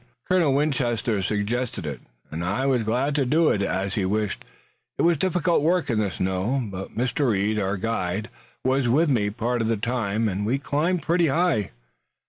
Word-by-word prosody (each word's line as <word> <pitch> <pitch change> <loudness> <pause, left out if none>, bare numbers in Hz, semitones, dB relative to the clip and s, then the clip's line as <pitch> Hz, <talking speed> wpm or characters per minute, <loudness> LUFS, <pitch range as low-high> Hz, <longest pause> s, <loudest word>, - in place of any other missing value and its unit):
Colonel 170 -7 +3
Winchester 120 -7 0
suggested 105 +1 -2
it, 70 -5 -4 0.3
and 80 +2 -4
I 100 +9 -1
was 130 -3 +2
glad 125 +6 0
to 140 -1 +2
do 155 +5 +3
as 95 -1 -1
he 100 - 0
wished. 105 +1 -1 0.5
It - - +1
was 170 0 +4
difficult 175 -2 +2
work 165 -2 +1
in 110 - +1
the 105 -2 +1
snow, 95 - -1
but 95 +2 -7
Mr. 125 +3 +1
Reed, 105 +1 +1
our 95 0 -1
guide, 105 +1 -2 0.3
was 130 0 +2
with 150 +5 +3
me 105 -5 +2
part 120 +3 -1
of 110 - 0
the 115 -1 +1
time, 110 -1 -1
and 100 0 -2
we 120 +6 +1
climbed 155 +4 0
pretty 170 +2 +2
high." 160 - +1
115 Hz, 180 wpm, -24 LUFS, 100-140 Hz, 0.5 s, was